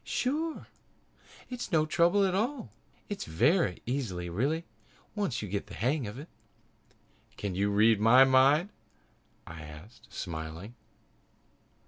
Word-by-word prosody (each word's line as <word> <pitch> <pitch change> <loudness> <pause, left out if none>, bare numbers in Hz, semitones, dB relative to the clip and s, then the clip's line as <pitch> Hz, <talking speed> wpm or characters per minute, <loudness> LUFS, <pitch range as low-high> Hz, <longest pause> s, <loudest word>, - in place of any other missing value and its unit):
"Sure! 310 +5 -2 0.9
It's 245 -4 -5
no 155 -3 +3
trouble 175 +5 +3
at 185 - 0
all. 230 +5 -2 0.4
It's 205 - -5
very 95 - +1
easy 110 -10 -3
really, 145 - -1 0.5
once 195 - -2
you - - -4
get 100 +2 -3
the 100 - -10
hang 130 +1 0
of 105 +4 -7
it." 145 +4 -9 1.1
"Can 100 -2 -3
you 100 +3 0
read 105 +1 +4
my 115 +5 +7
mind?" 135 +7 +4 0.8
I 85 -1 -9
asked, 80 +10 -13
smiling. 80 +4 -6
125 Hz, 125 wpm, -29 LUFS, -, 1.1 s, my